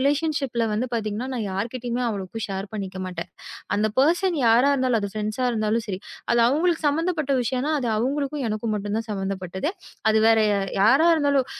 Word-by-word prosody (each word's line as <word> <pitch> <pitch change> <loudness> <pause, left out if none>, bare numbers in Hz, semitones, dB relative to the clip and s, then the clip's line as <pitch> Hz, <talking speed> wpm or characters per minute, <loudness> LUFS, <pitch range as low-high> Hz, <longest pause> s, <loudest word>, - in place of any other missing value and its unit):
ரிலேஷன்ஷிப்ல 280 -4 0
வந்து 225 +4 0
பாத்தீங்கன்னா 220 +2 -2
நான் 220 -4 -2
யார்கிட்டயும் 240 +4 -3
அவ்வளவு 205 +1 -5
ஷேர் 195 0 -4
பண்ணிக்க 195 -3 -5
மாட்டேன். 180 -2 -6 0.5
அந்த 215 +1 +2
பெர்சன் 345 +4 +3
யாரா 240 +5 +5
இருந்தாலும். 255 -4 +1
அது 200 - -3
ப்ரெண்ட்ஸ் 215 +3 -3
இருந்தாலும் 220 0 0
சரி. 190 -1 -3 0.3
அது 235 - +3
அவங்களுக்கு 325 +5 +1
சம்பந்தப்பட்ட 310 -1 0
விஷயம். 255 +2 -1 0.2
அது 245 - -2
அவங்களுக்கும் 280 +4 -1
எனக்கும் 215 0 -2
மட்டும் 205 0 -3
தான் 225 0 -4
சம்பந்தப்பட்டது. 190 - -3 0.4
அது 220 - +4
வேற 225 -1 +5 0.2
அ - - 0 0.2
யாரா 270 +11 +5
இருந்தாலும் 285 -4 +2
230 Hz, 165 wpm, -24 LUFS, 210-280 Hz, 0.5 s, யாரா